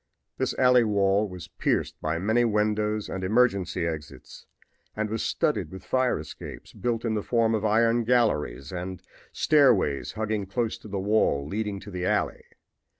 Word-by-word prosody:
This -, -, -1 dB
alley 125 Hz, -2 st, +5 dB
wall 100 Hz, -1 st, +2 dB
was 90 Hz, -2 st, -9 dB
pierced -, -, -1 dB
by 80 Hz, +1 st, -1 dB
many 110 Hz, +7 st, +2 dB
windows 105 Hz, -1 st, 0 dB
and 95 Hz, -, -5 dB
emergency 100 Hz, -4 st, +2 dB
exits 75 Hz, -3 st, -7 dB, 0.5 s
and 110 Hz, 0 st, -2 dB
was 110 Hz, -, -2 dB
studded -, -, 0 dB
with 95 Hz, -, -10 dB
fire 130 Hz, -1 st, +1 dB
escapes 75 Hz, 0 st, -9 dB
built 120 Hz, -1 st, -2 dB
in 115 Hz, -, 0 dB
the 105 Hz, -, 0 dB
form 115 Hz, 0 st, +1 dB
of 110 Hz, -1 st, 0 dB
iron 115 Hz, +2 st, +3 dB
galleries, 75 Hz, -, +1 dB
and 90 Hz, +1 st, -6 dB, 0.3 s
stairways 120 Hz, -, +3 dB
hugging 110 Hz, -2 st, -2 dB
close 115 Hz, +3 st, -1 dB
to -, -, -12 dB
the 100 Hz, -1 st, -4 dB
wall 95 Hz, -8 st, +2 dB
leading 105 Hz, +2 st, -3 dB
to 100 Hz, -, -10 dB
the 90 Hz, -1 st, -2 dB
alley. -, -, 0 dB
105 Hz, 160 wpm, -26 LUFS, 95-115 Hz, 0.5 s, alley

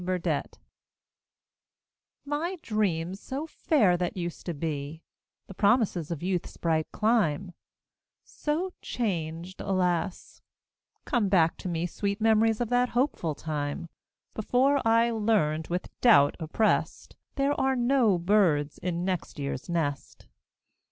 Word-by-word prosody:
BURDETTE 175 Hz, -4 st, -2 dB, 1.7 s
My 315 Hz, +6 st, -2 dB
dreams 190 Hz, -4 st, -1 dB
so 275 Hz, +7 st, -5 dB
fair 230 Hz, -, +2 dB
that 180 Hz, +1 st, -3 dB
used 175 Hz, 0 st, -5 dB
to 170 Hz, -, -2 dB
be, 150 Hz, +1 st, -4 dB, 0.4 s
The -, -, -10 dB
promises 200 Hz, -, +2 dB
of 170 Hz, -2 st, -4 dB
youth's 180 Hz, -1 st, -2 dB
bright 160 Hz, -2 st, 0 dB
clime, 195 Hz, -6 st, +1 dB, 0.7 s
So 340 Hz, +5 st, -3 dB
changed, 175 Hz, -4 st, -3 dB
alas; 180 Hz, -1 st, -1 dB, 0.6 s
come 235 Hz, -7 st, +1 dB
back 165 Hz, -4 st, +3 dB
to 185 Hz, -, -5 dB
me 170 Hz, 0 st, -1 dB
Sweet 200 Hz, +3 st, -2 dB
memories 225 Hz, 0 st, +3 dB
of 240 Hz, -2 st, -1 dB
that 245 Hz, 0 st, +2 dB
hopeful 210 Hz, -, 0 dB
time 150 Hz, +1 st, -4 dB, 0.4 s
Before 265 Hz, +6 st, +2 dB
I 230 Hz, +1 st, +4 dB
learned, 205 Hz, -9 st, +1 dB
with 180 Hz, +1 st, -3 dB
doubt 210 Hz, -, +6 dB
oppressed, 165 Hz, +7 st, 0 dB, 0.2 s
There 280 Hz, +1 st, +2 dB
are 265 Hz, 0 st, +2 dB
no 240 Hz, -5 st, +3 dB
birds 170 Hz, -6 st, +2 dB
in 175 Hz, 0 st, -2 dB
next 185 Hz, -4 st, -3 dB
year's 140 Hz, +1 st, -4 dB
nest. 150 Hz, -5 st, -3 dB
185 Hz, 120 wpm, -28 LUFS, 165-230 Hz, 1.7 s, doubt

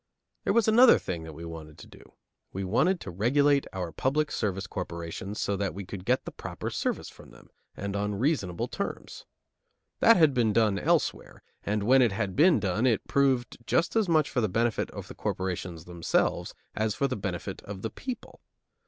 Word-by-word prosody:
There -, -, +2 dB
was 230 Hz, -2 st, +3 dB
another 235 Hz, +3 st, +7 dB
thing 85 Hz, -3 st, -5 dB
that 80 Hz, -, -8 dB
we 85 Hz, +2 st, -8 dB
wanted 80 Hz, -2 st, -9 dB
to -, -, -11 dB
do: -, -, -17 dB, 0.4 s
We 95 Hz, -, -4 dB
wanted 155 Hz, -, +2 dB
to 95 Hz, -, -6 dB
regulate 140 Hz, +9 st, +2 dB
our 90 Hz, -3 st, -4 dB
public 145 Hz, -, 0 dB
service 95 Hz, -2 st, -2 dB
corporations 85 Hz, +4 st, -5 dB
so 100 Hz, -, 0 dB
that 100 Hz, -1 st, -2 dB
we 100 Hz, 0 st, -6 dB
could 95 Hz, 0 st, -8 dB
get 125 Hz, +3 st, +1 dB
the -, -, -6 dB
proper -, -, -6 dB
service -, -, -2 dB
from -, -, -14 dB
them, -, -, -18 dB, 0.3 s
and 100 Hz, 0 st, -4 dB
on 105 Hz, 0 st, -1 dB
reasonable 100 Hz, -, 0 dB
terms. -, -, -6 dB, 0.7 s
That 230 Hz, -, +7 dB
had 155 Hz, -5 st, +5 dB
been 115 Hz, -4 st, +2 dB
done 105 Hz, -3 st, +3 dB
elsewhere, -, -, 0 dB, 0.2 s
and 105 Hz, 0 st, -1 dB
where 130 Hz, +5 st, +5 dB
it 115 Hz, -5 st, +3 dB
had 100 Hz, -3 st, -2 dB
been 160 Hz, 0 st, +5 dB
done 105 Hz, +5 st, +1 dB
it 115 Hz, -4 st, +2 dB
had -, -, -33 dB
proved 135 Hz, -3 st, +2 dB
just 170 Hz, +5 st, +1 dB
as 220 Hz, -5 st, +2 dB
much 155 Hz, -3 st, +3 dB
for 125 Hz, -, +1 dB
the 110 Hz, -, +1 dB
benefit 115 Hz, +3 st, 0 dB
of -, -, -8 dB
the -, -, -9 dB
corporations 90 Hz, -2 st, -4 dB
themselves 85 Hz, -2 st, -1 dB, 0.2 s
as 110 Hz, -1 st, 0 dB
for 140 Hz, -, +1 dB
the 130 Hz, -, -2 dB
benefit 95 Hz, -4 st, -4 dB
of 100 Hz, -1 st, -8 dB
the 115 Hz, -, -3 dB
people. 255 Hz, -3 st, -7 dB
105 Hz, 195 wpm, -28 LUFS, 95-140 Hz, 0.7 s, another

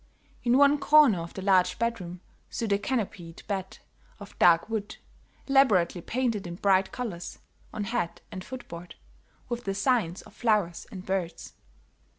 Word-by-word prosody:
In 245 Hz, +1 st, +4 dB
one 285 Hz, +1 st, +5 dB
corner 290 Hz, -, +6 dB
of 165 Hz, 0 st, -7 dB
the 190 Hz, -, -5 dB
large 190 Hz, -2 st, +3 dB
bedroom 180 Hz, -7 st, -3 dB, 0.3 s
stood 225 Hz, -3 st, -1 dB
a 200 Hz, -, +2 dB
canopied 200 Hz, -7 st, -4 dB
bed 190 Hz, -2 st, -4 dB, 0.4 s
of 205 Hz, -1 st, -11 dB
dark 170 Hz, -1 st, +5 dB
wood, 215 Hz, -2 st, -4 dB, 0.5 s
elaborately 210 Hz, -11 st, +3 dB
painted 230 Hz, -3 st, -1 dB
in 170 Hz, -, -6 dB
bright 190 Hz, 0 st, +2 dB
colors, 205 Hz, -9 st, -5 dB, 0.3 s
on 210 Hz, -, -4 dB
head 200 Hz, -5 st, -2 dB
and 185 Hz, -, -6 dB
foot 260 Hz, +3 st, -8 dB
board, 170 Hz, +1 st, -9 dB, 0.5 s
with 240 Hz, 0 st, -4 dB
designs 200 Hz, -2 st, 0 dB
of 215 Hz, -, -16 dB
flowers 210 Hz, -8 st, 0 dB
and 185 Hz, -1 st, -8 dB
birds. 180 Hz, -3 st, -3 dB
200 Hz, 150 wpm, -27 LUFS, 180-240 Hz, 0.5 s, corner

